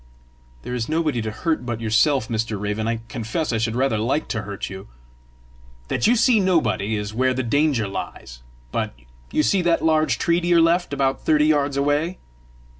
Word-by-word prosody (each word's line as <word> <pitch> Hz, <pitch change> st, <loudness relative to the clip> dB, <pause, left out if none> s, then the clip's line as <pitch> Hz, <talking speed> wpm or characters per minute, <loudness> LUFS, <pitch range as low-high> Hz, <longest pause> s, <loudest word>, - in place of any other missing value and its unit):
"There 125 Hz, -, -5 dB
is 120 Hz, -2 st, -3 dB
nobody 155 Hz, -6 st, 0 dB
to 110 Hz, -, -3 dB
hurt 155 Hz, +5 st, -2 dB
but 120 Hz, -2 st, -4 dB
yourself, 115 Hz, +3 st, +2 dB
Mr. 110 Hz, -2 st, -2 dB
Raven! 105 Hz, +2 st, -2 dB
I 115 Hz, 0 st, -1 dB
confess 115 Hz, +6 st, -3 dB
I 115 Hz, -, 0 dB
should 115 Hz, 0 st, -1 dB
rather 125 Hz, -4 st, +1 dB
like 130 Hz, +8 st, 0 dB
to 110 Hz, -, -2 dB
hurt 100 Hz, -1 st, -6 dB
you!" 95 Hz, -1 st, -9 dB, 1.0 s
"That -, -, +1 dB
you 240 Hz, -, +4 dB
see 230 Hz, -1 st, +4 dB
nobody 155 Hz, -, +1 dB
is 105 Hz, 0 st, -4 dB
where 130 Hz, +2 st, +1 dB
the 130 Hz, -, -1 dB
danger 135 Hz, -2 st, +1 dB
lies. -, -, -7 dB, 0.3 s
But -, -, -2 dB, 0.4 s
you 155 Hz, -, +2 dB
see 190 Hz, +5 st, +2 dB
that 170 Hz, -2 st, +1 dB
large 155 Hz, -5 st, +2 dB
tree 170 Hz, +1 st, +1 dB
to 175 Hz, -, -3 dB
your 175 Hz, -1 st, +5 dB
left, 170 Hz, +1 st, +2 dB
about 135 Hz, -1 st, 0 dB
thirty 150 Hz, -1 st, +3 dB
yards 145 Hz, -2 st, +1 dB
away?" 145 Hz, +5 st, 0 dB
135 Hz, 190 wpm, -22 LUFS, 110-160 Hz, 1.0 s, your